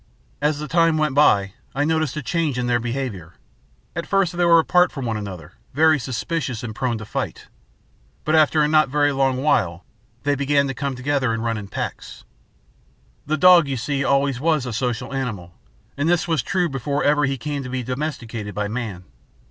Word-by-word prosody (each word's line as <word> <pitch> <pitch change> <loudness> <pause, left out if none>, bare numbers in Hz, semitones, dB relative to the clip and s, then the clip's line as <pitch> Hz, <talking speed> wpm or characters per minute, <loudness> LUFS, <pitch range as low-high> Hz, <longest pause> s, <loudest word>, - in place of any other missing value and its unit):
As 150 0 +1
the 150 +1 -5
time 165 -1 +3
went 155 -2 +1
by, 100 -9 +4 0.2
I 145 +1 +1
noticed 160 -2 0
a 150 - -3
change 160 -3 -1
in 125 - -1
their 120 0 +2
behavior. 115 -8 -4 0.6
At 170 - -4
first 195 -4 +1
they 175 - +1
were 170 -1 +6
apart 180 +2 +3
from 135 -4 -5
one 115 -2 -1
another, 95 -6 -7 0.2
very 155 0 +4
suspicious 130 0 -3
and 110 -2 -5
very - - -15
prone 125 -3 0
to 105 - -8
fight. - - -5 0.8
But 155 - +1
after 155 -1 +4
a - - +3
not 155 -2 +3
very 145 +1 +2
long 135 -1 0
while 90 - +1 0.4
they 145 0 +2
began 140 0 +1
to 135 - -3
come 140 0 -3
together 130 -2 0
and 115 - -4
run 115 -1 0
in 105 -2 -6
packs. 100 - -6 1.0
The 155 +1 0
dog, 175 -1 +7
you 135 -1 -2
see, 140 +3 -1
always 140 -2 +1
was 155 -2 +1
a 125 - -4
social 125 +2 -2
animal, 110 -10 -4 0.4
and 145 +3 0
this 175 +2 +2
was 160 -5 +1
true 180 +2 0
before 140 0 -2
ever 145 0 +3
he 135 0 -1
came 145 +3 -4
to 130 - -7
be 130 0 -3
domesticated 125 -5 -4
by 105 0 -1
man. 105 -5 -5
135 Hz, 200 wpm, -22 LUFS, 120-155 Hz, 1.0 s, dog